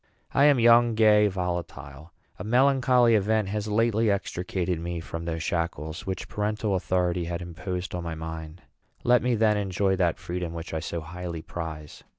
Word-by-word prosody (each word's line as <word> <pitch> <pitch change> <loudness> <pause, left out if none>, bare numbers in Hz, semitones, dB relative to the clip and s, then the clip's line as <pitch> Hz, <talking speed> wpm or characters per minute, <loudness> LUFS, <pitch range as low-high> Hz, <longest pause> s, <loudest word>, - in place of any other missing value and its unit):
I 140 - +5
am 145 -3 +5
young, 120 0 +5
gay, 105 -1 +5
volatile. 85 -5 -5 0.3
A - - -5
melancholy 125 0 +4
event 110 -1 +2
has 105 +1 -3
lately 115 +1 +2
extricated 90 -3 -2
me 85 0 -4
from 85 0 -6
those 80 -1 -3
shackles 85 0 -3
which 95 -2 -4
parental 105 0 -2
authority 90 -2 0
had 85 0 -3
imposed 90 +2 -5
on 90 -1 -3
my 85 -1 -4
mind. 80 +1 -7 0.4
Let 120 0 +4
me, 125 0 +1
then, 110 -1 +3
enjoy 95 -1 0
that 85 -3 +1
freedom 90 -1 -5
which 85 0 -7
I 80 - -1
so 85 +1 -4
highly 85 0 -6
prize. 80 -3 -7
90 Hz, 165 wpm, -26 LUFS, 85-110 Hz, 0.4 s, I